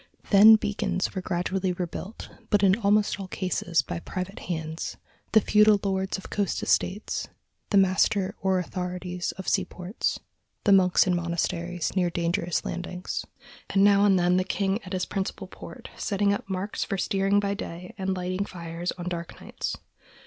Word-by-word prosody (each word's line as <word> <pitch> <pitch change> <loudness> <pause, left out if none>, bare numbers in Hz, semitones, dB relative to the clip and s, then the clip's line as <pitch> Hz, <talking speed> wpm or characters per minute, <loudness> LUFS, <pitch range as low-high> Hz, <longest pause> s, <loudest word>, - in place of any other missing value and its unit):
Then 215 +2 +9
beacons 205 -3 -1
were 190 - -3
gradually 185 +1 -1
rebuilt, 180 +4 -6 0.2
but 205 -2 +3
in 190 -1 +6
almost 205 -1 +2
all 195 - -5
cases 180 -2 0
by - - -4
private 185 +3 -5
hands—the 160 +5 -2
feudal 210 0 +5
lords 190 -1 -1
of 190 - -11
coast 200 -2 -1
estates, 200 +3 0 0.4
the 200 - +3
master 195 +1 +3
or 190 -1 +2
authorities 180 0 -3
of 190 +1 -9
sea 190 - +2
ports, 180 +3 -3 0.4
the 205 - +3
monks 185 -2 +5
in 180 -1 +2
monasteries 175 0 -2
near 180 -2 +2
dangerous 170 0 -1
landings, 180 +1 -4 0.4
and 195 - +3
now 200 0 +6
and 200 -2 +5
then 180 0 +3
the 185 - +2
king 195 +2 -1
at 185 - -7
his 185 -1 0
principal 195 -1 -3
port, - - -11
setting 200 0 +1
up 200 - -5
marks 190 +2 -2
for 195 - -3
steering 195 +2 +2
by 200 0 0
day 180 -2 -7
and 190 -1 -2
lighting 185 +2 -2
fires 170 -2 -5
on 175 -1 -7
dark 170 -1 -5
nights. - - -5
185 Hz, 165 wpm, -26 LUFS, 180-200 Hz, 0.4 s, Then